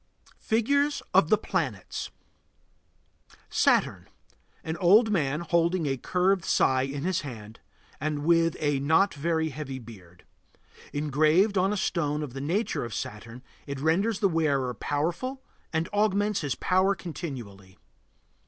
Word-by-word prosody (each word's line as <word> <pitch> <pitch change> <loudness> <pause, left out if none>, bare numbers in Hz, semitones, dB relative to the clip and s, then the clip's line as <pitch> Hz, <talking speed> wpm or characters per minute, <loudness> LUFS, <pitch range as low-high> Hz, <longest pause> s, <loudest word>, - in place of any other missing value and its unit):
FIGURES 280 +6 +1
OF 185 -4 +5
THE 215 - +5
PLANETS 135 - -3 1.4
SATURN. - - +2 0.6
An 160 - -3
old 210 +5 +5
man 150 -5 0
holding 170 0 +1
a 135 -2 0
curved 180 +7 +1
scythe 130 +1 +2
in 140 0 -5
his 185 0 0
hand 115 -5 -9 0.4
and 150 0 -2
with 165 -1 +3
a 145 -2 +1
not 160 +8 +3
very 160 +2 -1
heavy 135 -2 -6
beard. 95 -8 -14 0.7
Engraved 155 +7 +2
on 190 +1 +2
a 210 - -1
stone 150 -5 -1
of 135 -5 -7
the 135 - -5
nature 180 +11 -1
of 115 -3 -5
Saturn, 115 +4 -7 0.2
it 140 -1 -5
renders 190 +9 +1
the 200 - +5
wearer 145 -7 0
powerful 170 - -3 0.3
and 160 +1 -1
augments 205 0 +1
his 145 -4 -2
power 190 +2 +2
continually. 120 - -8
160 Hz, 135 wpm, -27 LUFS, 135-190 Hz, 1.4 s, OF